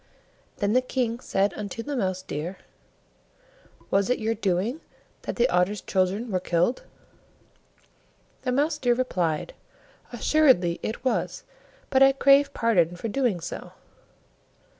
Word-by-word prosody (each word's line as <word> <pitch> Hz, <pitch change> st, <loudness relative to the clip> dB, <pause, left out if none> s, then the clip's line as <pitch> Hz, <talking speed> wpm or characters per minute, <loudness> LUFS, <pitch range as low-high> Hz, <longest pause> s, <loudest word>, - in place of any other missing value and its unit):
Then 205 Hz, 0 st, 0 dB
the 255 Hz, -, +4 dB
King 245 Hz, -2 st, -2 dB
said 195 Hz, -4 st, 0 dB
unto 210 Hz, +2 st, -6 dB
the 290 Hz, +2 st, -4 dB
Mouse 185 Hz, -5 st, -1 dB
deer, 170 Hz, +3 st, -5 dB, 1.3 s
"Was 195 Hz, +2 st, +2 dB
it 250 Hz, -, +2 dB
your 220 Hz, 0 st, -1 dB
doing 210 Hz, -, -1 dB, 0.4 s
that -, -, -5 dB
the 240 Hz, +1 st, +3 dB
Otter's 180 Hz, +2 st, +1 dB
children 195 Hz, +5 st, -1 dB
were 185 Hz, -, +1 dB
killed?" 175 Hz, +7 st, 0 dB, 1.6 s
The 255 Hz, -, -1 dB
Mouse 295 Hz, +4 st, +1 dB
deer 245 Hz, -3 st, +2 dB
replied, 180 Hz, -11 st, -1 dB, 0.6 s
"Assuredly 255 Hz, -, +3 dB
it 235 Hz, +4 st, -5 dB
was, 255 Hz, -, -1 dB, 0.5 s
but 265 Hz, -, +3 dB
I 270 Hz, 0 st, +7 dB
crave 275 Hz, +1 st, +5 dB
pardon 180 Hz, -, +2 dB
for 220 Hz, +6 st, -5 dB
doing 235 Hz, -5 st, 0 dB
so." -, -, -7 dB
225 Hz, 130 wpm, -25 LUFS, 185-255 Hz, 1.6 s, I